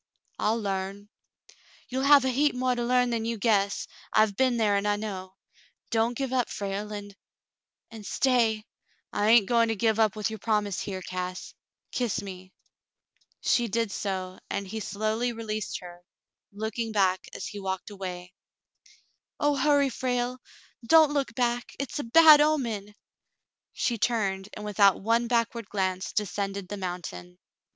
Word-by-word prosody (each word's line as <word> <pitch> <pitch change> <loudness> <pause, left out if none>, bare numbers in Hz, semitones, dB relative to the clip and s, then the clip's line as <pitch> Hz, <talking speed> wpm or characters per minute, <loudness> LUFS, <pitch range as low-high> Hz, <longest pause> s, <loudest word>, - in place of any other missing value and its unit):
"I'll 220 +2 +1
larn." 200 0 -4 0.8
"You'll 260 +1 -2
have 280 -2 +7
a - - +2
heap 285 +2 +2
more 255 0 +1
to 240 -1 -2
learn 250 0 +2
than 230 -1 -1
you 230 0 -2
guess. 200 -2 +1 0.2
I've 215 -2 +3
been 255 +1 +2
there, 210 -3 +2
and 200 +1 0
I 205 - +2
know. 190 -3 -6 0.6
Don't 230 +1 +1
give 270 -2 -2
up, 250 -2 +1
Frale, 200 +1 -4
and 205 -1 -7 0.4
— - - -59
and 220 -2 -9
stay—" 225 -2 +1 0.5
"I 205 - +1
hain't 225 -2 +6
going 230 +1 +3
to 225 - 0
give 220 +1 +1
up 220 -2 +3
with 215 +1 -2
your 220 - -6
promise 205 -2 0
here, 190 -2 -5
Cass; 185 0 -5 0.4
kiss 245 -4 -1
me." 185 -1 -9 0.9
She 240 -1 +2
did 230 0 -1
so, 185 -3 -4
and 200 -1 -3
he 220 +3 -5
slowly 215 +4 -1
released 215 -3 -4
her, 175 -1 -11 0.5
looking 220 +2 -3
back 190 -3 +2 0.2
as - - -5
he 205 - -6
walked 190 +1 -4
away. 180 -2 -7 1.1
"Oh, 290 0 +2
hurry, 280 0 +3
Frale! 245 0 -2 0.4
Don't 310 +4 +6
look 275 -5 -1
back. 245 -1 -1
It's 275 +1 -4
a - - -2
bad 305 +4 +8
omen." 230 -10 0 0.8
She 240 -5 -1
turned, 200 -4 0
and 210 - -7
without 200 -2 +4
one 230 +2 +2
backward 230 -2 0
glance 190 -2 -1
descended 200 -2 -3
the 205 - -4
mountain. 165 - -6
215 Hz, 160 wpm, -27 LUFS, 195-240 Hz, 1.1 s, bad